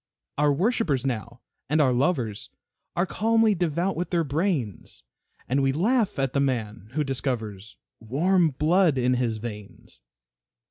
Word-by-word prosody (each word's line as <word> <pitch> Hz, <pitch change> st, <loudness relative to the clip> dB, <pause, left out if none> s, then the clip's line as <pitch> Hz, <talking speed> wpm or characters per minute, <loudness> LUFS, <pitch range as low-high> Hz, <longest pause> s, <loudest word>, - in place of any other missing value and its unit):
Our 150 Hz, 0 st, +4 dB
worshipers 165 Hz, -, +1 dB
now 120 Hz, -1 st, -4 dB, 0.3 s
and 155 Hz, +2 st, +2 dB
our 135 Hz, -4 st, +4 dB
lovers 120 Hz, -, -1 dB, 0.5 s
Are 175 Hz, -, +2 dB
calmly 225 Hz, +3 st, +2 dB
devout 175 Hz, +1 st, -1 dB
with 175 Hz, +1 st, -3 dB
their 170 Hz, -2 st, +1 dB
brains, 145 Hz, -, -2 dB, 0.4 s
And 135 Hz, +3 st, +1 dB
we 135 Hz, 0 st, +2 dB
laugh 210 Hz, -, +1 dB
at 135 Hz, -2 st, -1 dB
the 140 Hz, -, +1 dB
man 115 Hz, -6 st, -2 dB
who 150 Hz, +1 st, 0 dB
discovers 115 Hz, -7 st, -4 dB, 0.2 s
Warm 165 Hz, -, +2 dB
blood 155 Hz, +2 st, +2 dB
in 125 Hz, 0 st, +2 dB
his 120 Hz, -3 st, 0 dB
veins. 105 Hz, -2 st, -9 dB
140 Hz, 140 wpm, -25 LUFS, 120-175 Hz, 0.5 s, Our